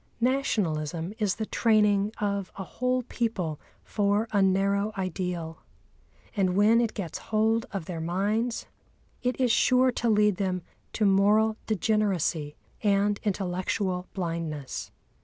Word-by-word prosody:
Nationalism 180 - 0
is 205 -3 +1
the 220 - -3
training 210 -3 +3
of 200 -2 -1
a 195 - -4
whole 255 +5 -1
people 205 -11 -2 0.2
for 205 +1 +1
a 205 -2 +3
narrow 200 +2 +2
ideal; 180 -3 -3 0.8
and 185 -3 +1
when 215 +4 +5
it 230 -2 -1
gets 180 -7 -4
hold 225 +2 +2
of 195 -5 -4
their 165 -2 -5
minds 205 +8 -1 0.6
it 250 +1 -1
is 250 -3 +3
sure 255 +2 +4
to 240 -1 -1
lead 210 -3 +3
them 185 -3 -1 0.3
to 215 - +1
moral 205 +3 +4
degeneracy 190 -8 0 0.3
and 205 0 +2
intellectual 185 -1 -1
blindness. 165 -6 -4
200 Hz, 125 wpm, -27 LUFS, 180-220 Hz, 0.8 s, when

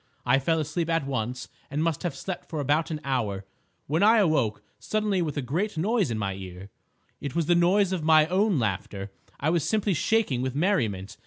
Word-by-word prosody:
I 135 +2 +4
fell 160 +4 +1
asleep 160 +2 -2
at 165 -4 +1
once 125 -1 -3 0.2
and 150 +3 -1
must 165 -3 -1
have 175 - -3
slept 190 -2 -6
for 160 - -4
about 145 +3 +1
an 155 -2 -3
hour, 110 -8 -2 0.4
when 155 +4 0
I 220 +3 +6
awoke 155 - +1 0.2
suddenly 210 -3 0
with 150 -4 -3
a 145 - -1
great 170 - -2
noise 205 - +1
in 115 - -2
my 100 -2 -2
ears. 95 0 -9 0.5
It 140 +1 -5
was 170 -2 +1
the 175 - +3
noise 180 +3 +3
of 180 - -2
my 155 -1 +6
own 190 +2 +2
laughter! 100 -3 -3 0.3
I 150 +3 +1
was 170 -3 +1
simply 210 -2 +1
shaking 175 - +1
with 130 0 -2
merriment. 115 - 0
155 Hz, 200 wpm, -26 LUFS, 125-180 Hz, 0.5 s, I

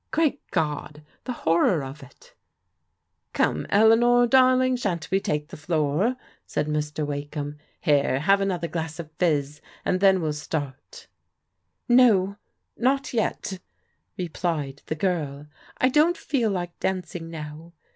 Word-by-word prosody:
Great 310 -3 +1
God, 150 -2 -2 0.2
the 255 - -3
hor 170 -8 +1
ror 155 -8 +1
of 135 +3 -10
it 135 - -17 1.0
f - - -7
"0>me, 75 - -4
Eleanor 235 +3 +5
darling, 255 +1 +4
shan't 185 -9 -3
we 190 - +3
take 150 -4 -2
the - - -8
floor?'* 155 - 0 0.3
said - - -1
Mr. 150 0 -2
Wakeham. 145 0 -5
" - - -41
Here, 140 -2 +2
have 195 +4 +4
another 180 -4 -1
glass 160 -2 -4
of 160 -3 -8
fizz, 150 -4 0 0.2
and 185 - +1
then 190 -1 +5
well 155 -3 -1
start." 145 -2 -6 0.8
"No, 215 -6 +5 0.4
not 270 +3 0
yet!" 205 -4 -2 0.6
replied 160 -5 -3
the 155 - -2
girl. 150 -5 -2 0.3
"I 255 - +3
don't 310 +6 +3
feel 260 -8 0
like 175 -3 -4
dancing 175 -3 -3
now. 160 +1 -8
170 Hz, 140 wpm, -25 LUFS, 150-215 Hz, 1.0 s, Eleanor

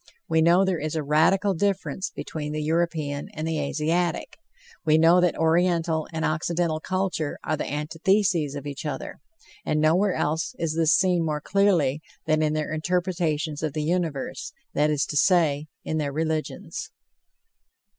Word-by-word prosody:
We 160 0 +2
know 175 +4 +5
there 185 -3 0
is 155 +1 -3
a 155 - -1
radical 170 +7 +3
difference 195 +1 -1
between 150 -1 -6
the 155 - -2
European 155 -3 -1
and 155 +1 -3
the 160 -1 -1
Asiatic; 160 +4 -1 0.4
we 155 -1 +4
know 165 +3 +6
that 180 -1 +1
Oriental 165 -1 +2
and 160 -1 -2
Occidental 160 0 0
culture 185 -4 -2
are 155 - 0
the 150 - -4
antitheses 165 +1 +1
of 145 -1 -6
each 140 -2 -6
other, 150 -4 -5 0.4
and 155 - 0
nowhere 180 +6 +3
else 155 +2 -1
is 165 -2 -1
this 165 -1 +4
seen 180 -3 +2
more 155 -2 -1
clearly 170 -7 +2 0.2
than 155 0 +2
in 155 -1 +1
their 155 0 -2
interpretations 165 -2 -1
of 155 -3 -2
the 155 -1 -2
universe, 165 -4 -2 0.2
that 150 +1 +2
is 150 -2 +1
to - - -6
say, 155 -3 +3 0.2
in 155 - -2
their 145 -2 -1
religions. 155 +1 -3
160 Hz, 160 wpm, -25 LUFS, 150-175 Hz, 0.4 s, know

